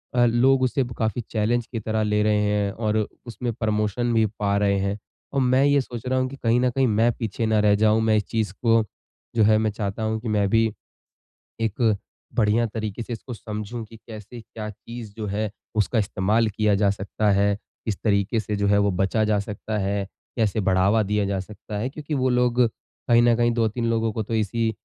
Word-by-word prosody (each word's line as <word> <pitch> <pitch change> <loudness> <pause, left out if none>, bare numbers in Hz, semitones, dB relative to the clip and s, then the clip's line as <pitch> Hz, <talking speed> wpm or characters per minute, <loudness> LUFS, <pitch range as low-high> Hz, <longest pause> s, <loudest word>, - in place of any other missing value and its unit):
अ, 120 0 +5
लोग 130 +3 +4
उसे 130 +1 +1
काफ़ी 110 +1 -1
चैलेंज 115 +2 +1
की 115 - -4
तरह 110 0 -1
ले 105 0 +1
रहे 105 -1 +2
हैं 105 -1 +1
और 110 0 -1 0.3
उसमें 120 +1 -4
प्रमोशन 110 +1 0
भी 110 -1 +4
पा 100 -1 +1
रहें 100 -1 +2
हैं। 100 +1 -1 0.4
और 135 - +2
मैं 130 +2 +3
ये 140 -1 +4
सोच 120 -2 -8
रहा 130 0 +1
हूँ 130 0 0
कि 140 - -8
कहीं 115 +1 +3
न 125 - +3
कहीं 130 +1 +1
मैं 115 +2 +3
पीछे 115 0 -2
ना 110 -1 +2
रह 105 -1 +4
जाऊँ, 110 +1 +3
मैं 110 -1 +3
इस 105 - +1
चीज़ 110 -4 -1
को 115 -2 +4 0.5
जो 110 - +4
है 110 0 +5
मैं 110 -1 +1
चाहता 105 +1 -4
हूँ 110 0 -1
कि 120 - -6
मैं 105 -2 +2
भी 115 +1 +4 1.0
एक 110 0 +1 0.4
बढ़िया 115 +1 +3
तरीके 110 0 -4
से 120 - -7
इसको 120 +2 -6
समझूँ 110 +2 -6
कि 115 +1 -14
कैसे 110 +2 -9
क्या 110 -1 -8
चीज़ 115 0 -9
जो 110 -2 -4
है 105 +1 -2 0.3
उसका 110 +2 +1
इस्तेमाल 105 +3 +1
किया 105 0 +1
जा 100 0 +3
सकता 100 +1 -1
है। 100 +1 +3 0.3
किस 105 -4 -1
तरीके 105 +1 +2
से 105 0 -3
जो 100 0 0
है 100 0 +4
वो 100 0 +3
बचा 95 +4 +1
जा 105 -1 +2
सकता 105 +1 -4
है, 100 0 -1 0.3
कैसे 110 -2 +1
बढ़ावा 95 +3 +3
दिया 105 0 0
जा 100 -1 -1
सकता 105 +1 -8
है, 125 +5 -1
क्योंकि 150 +1 -5
वो 130 -1 +1
लोग 125 0 +2 0.5
कहीं 120 0 +6
न 120 -1 +5
कहीं 120 0 +3
2-3 115 0 0
लोगों 115 -1 +1
को 110 - -2
तो 115 +2 -4
इसी 110 +1 0
110 Hz, 215 wpm, -24 LUFS, 105-115 Hz, 1.0 s, कहीं